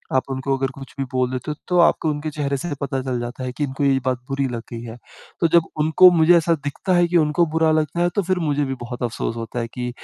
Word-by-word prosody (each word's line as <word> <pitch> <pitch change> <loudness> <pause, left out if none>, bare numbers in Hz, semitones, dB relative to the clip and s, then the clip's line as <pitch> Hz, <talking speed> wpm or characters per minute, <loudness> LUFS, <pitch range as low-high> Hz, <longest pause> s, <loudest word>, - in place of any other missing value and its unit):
आप 130 - +3
उनको 135 +1 -1
अगर 135 0 -1
कुछ 135 0 -11
भी - - +1
बोल 130 0 +1
देते 130 +3 -4
हो 150 - -4
तो 180 - +1
आपको 165 -1 +3
उनके 150 +1 -3
चेहरे 140 -2 -2
से 175 +6 -5
पता 135 -1 -2
चल 130 -2 -2
जाता 120 +2 -6
है 125 - -3
कि 150 - -1
इनको 135 0 -3
ये 135 -1 +3
बात 130 -1 0
बुरी 135 0 0
लग 120 -1 -4
गई 115 -1 -6
है। 115 0 -8 0.4
तो 165 - +4
जब 170 - +6 0.2
उनको 160 +4 +7
मुझे 170 +1 +5
ऐसा 165 0 +2
दिखता 165 +6 -2
है 175 0 +4
कि 175 0 +2
उनको 155 +2 +3
बुरा 160 -1 +3
लगता 155 +2 0
है 175 - +3
तो 205 - +2
फ़िर 185 +1 0
मुझे 145 0 +1
भी 135 0 -3
बहुत 125 0 -6
अफ़सोस 115 0 -2
होता 115 +1 -5
है 115 - -2
कि 125 0 -2
140 Hz, 275 wpm, -21 LUFS, 130-160 Hz, 0.4 s, उनको